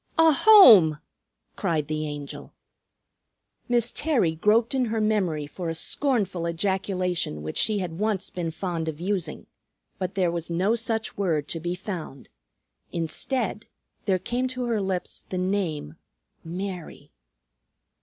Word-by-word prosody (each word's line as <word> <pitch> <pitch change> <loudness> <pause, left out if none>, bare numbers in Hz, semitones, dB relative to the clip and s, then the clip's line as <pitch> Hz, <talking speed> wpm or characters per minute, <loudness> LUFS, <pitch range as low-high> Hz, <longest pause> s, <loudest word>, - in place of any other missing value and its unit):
"A 325 0 +7
home!" 245 - +8 0.6
cried 165 -7 -1
the 155 0 -2
Angel. 145 -1 -8 1.1
Miss 240 -1 +2
Terry 265 - +1
groped 215 +9 +2
in 260 -2 +2
her 225 -1 -1
memory 195 -9 0
for 170 +3 -5
a 165 - -2
scornful 195 - 0
ejaculation 180 - -1
which 80 - -4
she 215 -1 +2
had 175 -3 -4
once 210 -3 -1
been 175 -2 -3
fond 165 -1 -3
of 155 -1 -4
using, 180 -4 -3 0.5
but 185 +1 -3
there 180 -3 +2
was 170 -1 -4
no 185 +6 +1
such 225 -1 -2
word 160 -7 0
to 165 - -3
be 175 +2 -3
found. 180 -8 -7 0.6
Instead 210 - -2 0.4
there 190 -3 +2
came 245 +7 -2
to 255 -1 -4
her 230 -3 0
lips 190 -2 -3
the 185 - -3
name, 180 - -2 0.5
"Mary." 180 0 -6
185 Hz, 135 wpm, -25 LUFS, 165-220 Hz, 1.1 s, home